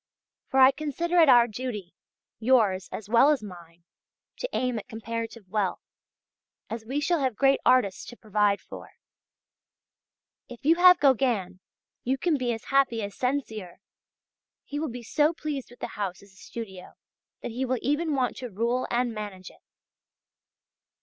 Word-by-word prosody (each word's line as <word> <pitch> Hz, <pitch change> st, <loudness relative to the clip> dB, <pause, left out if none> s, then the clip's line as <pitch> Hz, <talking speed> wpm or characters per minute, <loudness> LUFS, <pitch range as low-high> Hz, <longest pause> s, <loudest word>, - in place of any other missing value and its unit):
For 265 Hz, -, +1 dB
I 260 Hz, 0 st, +8 dB
consider 310 Hz, +5 st, -1 dB
it 320 Hz, -4 st, +6 dB
our 240 Hz, -2 st, +7 dB
duty, 215 Hz, -6 st, -6 dB, 0.5 s
yours 220 Hz, -6 st, +2 dB
as 210 Hz, -, -6 dB
well 235 Hz, +6 st, +5 dB
as 285 Hz, -7 st, +1 dB
mine, 170 Hz, -3 st, -12 dB, 0.5 s
to -, -, -4 dB
aim 250 Hz, -3 st, -1 dB
at -, -, -12 dB
comparative 225 Hz, -1 st, -6 dB
wealth, 195 Hz, -1 st, -2 dB, 0.9 s
as 225 Hz, 0 st, -4 dB
we 270 Hz, +4 st, -1 dB
shall 335 Hz, +3 st, +1 dB
have 260 Hz, -5 st, 0 dB
great 270 Hz, +3 st, +3 dB
artists 210 Hz, -7 st, +3 dB
to 240 Hz, -, -11 dB
provide 210 Hz, -2 st, +1 dB
for. -, -, -11 dB, 1.6 s
If 245 Hz, +2 st, -12 dB
you 320 Hz, -, +6 dB
have 360 Hz, 0 st, +7 dB
Gauguin, 235 Hz, -9 st, +2 dB, 0.4 s
you 260 Hz, +2 st, 0 dB
can 335 Hz, +2 st, +1 dB
be 250 Hz, -3 st, -1 dB
as 225 Hz, 0 st, -5 dB
happy 255 Hz, -5 st, +3 dB
as 200 Hz, 0 st, -5 dB
Sensier. 225 Hz, -9 st, -3 dB, 0.9 s
He 290 Hz, -, -5 dB
will 315 Hz, -1 st, -2 dB
be 245 Hz, 0 st, -8 dB
so 300 Hz, +7 st, +2 dB
pleased 295 Hz, -5 st, -5 dB
with 245 Hz, -, -17 dB
the -, -, -3 dB
house 195 Hz, -2 st, -4 dB
as 200 Hz, -1 st, -19 dB
a -, -, -24 dB
studio, 190 Hz, -2 st, -9 dB, 0.5 s
that -, -, -4 dB
he 250 Hz, +4 st, -3 dB
will 255 Hz, 0 st, 0 dB
even 295 Hz, +2 st, 0 dB
want 255 Hz, -2 st, 0 dB
to 250 Hz, -, -6 dB
rule 235 Hz, +5 st, -1 dB
and 240 Hz, -1 st, 0 dB
manage 205 Hz, -4 st, -7 dB
it. -, -, -23 dB
240 Hz, 165 wpm, -27 LUFS, 210-275 Hz, 1.6 s, I